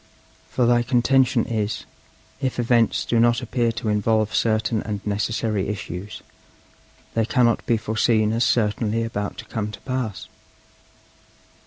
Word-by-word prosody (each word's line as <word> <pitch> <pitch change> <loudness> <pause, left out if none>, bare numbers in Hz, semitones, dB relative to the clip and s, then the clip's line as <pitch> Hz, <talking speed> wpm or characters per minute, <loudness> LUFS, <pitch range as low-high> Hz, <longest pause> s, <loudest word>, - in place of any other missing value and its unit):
For 125 - +1
thy 120 0 +4
contention 125 0 +2
is, 110 -2 -2 0.6
if 130 -2 -1
events 120 -1 +2
do 115 - +1
not 120 0 +4
appear 120 -2 0
to 115 -1 -3
involve 110 +1 +1
certain 110 0 +1
and 105 -2 -4
necessary 105 0 -1
issues, 100 -1 -6 0.9
they 115 - +2
cannot 120 -1 +2
be 115 - +3
foreseen 110 0 +1
as 115 +2 +1
certainly 115 0 +1
about 105 -4 -4
to 110 - -8
come 105 -1 -4
to - - -10
pass. 130 -6 -4
115 Hz, 135 wpm, -23 LUFS, 105-120 Hz, 0.9 s, thy